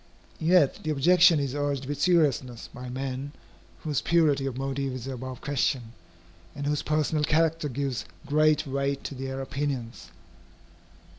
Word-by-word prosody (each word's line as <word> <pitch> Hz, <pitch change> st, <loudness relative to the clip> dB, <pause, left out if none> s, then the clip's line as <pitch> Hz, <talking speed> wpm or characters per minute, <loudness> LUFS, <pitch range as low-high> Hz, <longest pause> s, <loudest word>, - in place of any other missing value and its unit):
Yet 160 Hz, -3 st, +4 dB
the 155 Hz, -, -4 dB
objection 170 Hz, +3 st, +5 dB
is 140 Hz, -2 st, -2 dB
urged 145 Hz, -2 st, -1 dB
with 145 Hz, +1 st, -4 dB
seriousness 140 Hz, -9 st, +2 dB
by 125 Hz, 0 st, -7 dB
men 135 Hz, +2 st, -4 dB, 0.5 s
whose 150 Hz, -4 st, -1 dB
purity 150 Hz, -5 st, +2 dB
of 130 Hz, -2 st, -4 dB
motive 135 Hz, 0 st, -2 dB
is 130 Hz, -2 st, -6 dB
above 130 Hz, -1 st, -6 dB
question, 130 Hz, -4 st, -1 dB, 0.6 s
and 145 Hz, -, -4 dB
whose 150 Hz, 0 st, 0 dB
personal 155 Hz, 0 st, 0 dB
character 160 Hz, 0 st, +2 dB
gives 135 Hz, -1 st, -3 dB, 0.2 s
great 155 Hz, +1 st, +3 dB
weight 140 Hz, 0 st, -2 dB
to -, -, -5 dB
their 135 Hz, 0 st, -4 dB
opinions. 125 Hz, -, -4 dB
140 Hz, 140 wpm, -27 LUFS, 130-150 Hz, 0.6 s, objection